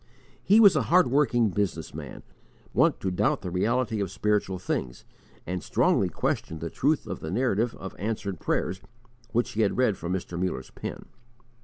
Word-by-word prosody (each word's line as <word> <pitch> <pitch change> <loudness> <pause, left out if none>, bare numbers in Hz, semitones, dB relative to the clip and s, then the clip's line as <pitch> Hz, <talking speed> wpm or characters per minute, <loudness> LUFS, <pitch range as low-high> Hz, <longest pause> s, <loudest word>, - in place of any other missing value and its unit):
He 210 +3 +5
was 200 -6 +8
a 155 - +3
hard 175 -6 +5
working 120 -5 +3
business 90 -5 -2
man, - - -8 0.5
wont - - +3
to 95 - -1
doubt 90 - +1
the 90 - -4
reality 115 +5 0
of 100 -2 -1
spiritual 100 -1 0
things, 65 -8 -4 0.4
and 90 0 -3
strongly - - +2
questioned 80 - -2
the - - -5
truth - - +1
of - - -5
the 80 - -6
narrative 115 +2 0
of 95 - -8
answered 100 -3 -3
prayers 95 +1 -1 0.5
which 120 +1 0
he 110 - -1
had 105 - +1
read 120 -7 +2
from 85 - -4
Mr. 90 -1 -3
Muller's 95 - -3
pen. - - -7
100 Hz, 175 wpm, -27 LUFS, 90-120 Hz, 0.5 s, was